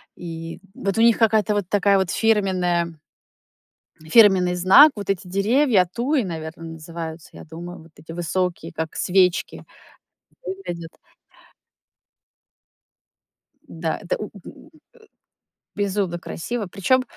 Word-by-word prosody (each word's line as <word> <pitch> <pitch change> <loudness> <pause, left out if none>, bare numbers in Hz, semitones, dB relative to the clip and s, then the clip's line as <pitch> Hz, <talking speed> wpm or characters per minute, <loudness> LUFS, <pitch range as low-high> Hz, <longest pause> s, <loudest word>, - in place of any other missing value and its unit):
И 165 -1 -7 0.2
вот 195 +1 -2
у - - +3
них 230 -1 +5
какая-то 215 -2 +2
вот 205 -4 -1
такая 200 -1 +3
вот 190 -2 0
фирменная 185 -6 +1 1.2
фирменный 190 -3 +5
знак. 190 - +7
Вот 205 -2 -7
эти 195 -2 -1
деревья, 200 +2 +2
туи, 255 +5 0
наверное, 165 -2 -7
называются, 160 0 -8
я - - -11
думаю, 170 +3 -9
вот 165 - -19
эти 160 - -12
высокие, 175 0 -2
как 160 -1 -5
свечки. 180 -1 +1 0.8
Выглядит. 175 - -6 2.8
Да, 160 -7 -3
это 185 -3 -2
у 210 - -4 0.2
у - - -13
э, - - -19 1.1
безумно 195 -3 -1
красиво. 210 +7 -5
Причём 255 +8 +1
185 Hz, 115 wpm, -22 LUFS, 170-210 Hz, 2.8 s, знак